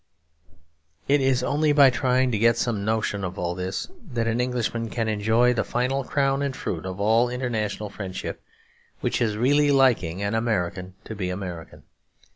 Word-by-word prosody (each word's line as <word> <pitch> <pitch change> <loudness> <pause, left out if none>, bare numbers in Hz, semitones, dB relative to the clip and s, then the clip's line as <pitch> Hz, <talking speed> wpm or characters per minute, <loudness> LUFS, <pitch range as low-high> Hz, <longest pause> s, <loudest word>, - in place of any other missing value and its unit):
It 145 0 +3
is 130 -2 +2
only 150 +2 +2
by 140 -2 +7
trying 125 +1 +1
to 110 - 0
get 115 +1 +4
some 115 -4 -1
notion 110 -2 -1
of 90 0 -4
all 85 0 -2
this 90 +1 -4 0.3
that 115 -1 0
an 115 +1 0
Englishman 120 -2 -2
can 115 -1 -2
enjoy 110 +3 +2
the 120 - 0
final 130 +3 -1
crown 135 +1 0
and 140 -2 -2
fruit 90 -5 -4
of 95 +1 -6
all 115 +4 +3
international 110 -5 -3
friendship; 95 -2 -6 0.6
which - - -1
is 110 -3 0
really 145 +5 +3
liking 120 -10 +2
an 100 +1 -1
American 95 -5 -1
to - - -7
be 95 -4 -3
American. 90 -3 -7
115 Hz, 170 wpm, -24 LUFS, 100-125 Hz, 0.6 s, by